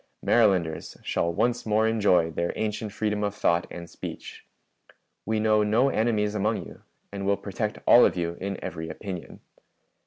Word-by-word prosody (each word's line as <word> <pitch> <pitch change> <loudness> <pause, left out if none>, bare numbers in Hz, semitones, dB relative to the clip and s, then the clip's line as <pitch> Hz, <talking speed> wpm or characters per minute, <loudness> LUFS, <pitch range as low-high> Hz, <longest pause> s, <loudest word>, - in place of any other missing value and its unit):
Marylanders 95 -9 +2
shall 85 - 0
once 120 +7 0
more 110 0 +2
enjoy 100 -7 +3
their 85 +1 -1
ancient 110 0 -3
freedom 105 0 -1
of 100 0 -2
thought 85 -4 +1
and 85 -1 -8
speech. - - -9 0.8
We 110 0 +1
know 110 0 +3
no 110 +6 +3
enemies 110 -4 +1
among 105 +2 -1
you, - - -13 0.3
and 100 -1 -5
will 100 0 +1
protect 105 +2 -4
all 120 - +8
of - - +3
you 85 -1 -2
in 100 0 -3
every 80 -1 -5
opinion. 90 +2 -7
105 Hz, 160 wpm, -26 LUFS, 90-110 Hz, 0.8 s, all